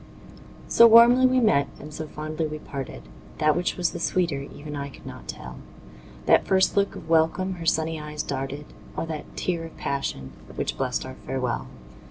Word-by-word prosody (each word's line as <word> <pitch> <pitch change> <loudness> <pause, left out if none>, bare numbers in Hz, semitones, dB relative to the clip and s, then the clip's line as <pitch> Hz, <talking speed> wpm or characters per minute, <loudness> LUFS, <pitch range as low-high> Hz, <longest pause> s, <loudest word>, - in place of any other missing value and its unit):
So 235 - +8
warmly 240 +3 +8
we 255 0 +3
met 140 - +3
and 150 +1 -10
so 155 0 -5
fondly 155 +1 -3
we 155 0 -5
parted, 135 - -7 0.3
That 155 -1 +3
which 180 - -1
was 175 -2 +1
the 175 - -6
sweeter 170 -5 0
even 145 +1 -8
I 140 0 -4
could - - -15
not - - -9
tell, 60 0 -8 0.7
That - - +4
first 190 0 +3
look 200 -1 +1
of 160 - -9
welcome 165 +4 +2
her 165 - -4
sunny 160 0 +1
eyes 150 0 -5
darted, 135 +2 -4 0.3
Or - - -1
that 160 -2 -7
tear 170 -2 -1
of 165 - -10
passion, 135 - -3 0.2
which - - -2
blest - - -2
our - - -8
farewell. - - -2
155 Hz, 185 wpm, -25 LUFS, 145-180 Hz, 0.7 s, So